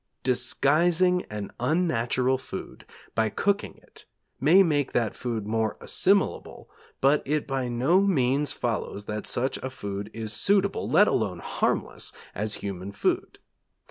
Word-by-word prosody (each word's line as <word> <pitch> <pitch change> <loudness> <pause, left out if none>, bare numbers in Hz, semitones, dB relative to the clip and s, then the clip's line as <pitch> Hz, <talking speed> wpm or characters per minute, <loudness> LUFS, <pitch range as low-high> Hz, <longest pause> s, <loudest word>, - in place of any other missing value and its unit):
Disguising 170 +8 +2
an 105 -1 -5
unnatural 130 -3 +1
food - - -8 0.3
by 110 -1 +1
cooking 200 - -1
it - - -15 0.3
may 170 +8 +6
make 145 -6 0
that 115 -3 0
food 115 -4 -3
more 110 0 -1
assimilable, 200 +1 0 0.3
but 140 +2 +4
it 150 +1 -1
by 135 -2 -2
no 130 +10 +3
means 145 -7 +2
follows 105 -3 -3
that 105 0 -4
such 130 +2 0
a 130 - -5
food 100 -5 -6
is 110 -1 -4
suitable, 200 - +1
let - - +6
alone - - 0
harmless, - - -2 0.2
as 105 +2 -2
human 95 0 -5
food. 100 - -1
130 Hz, 135 wpm, -26 LUFS, 110-160 Hz, 0.3 s, may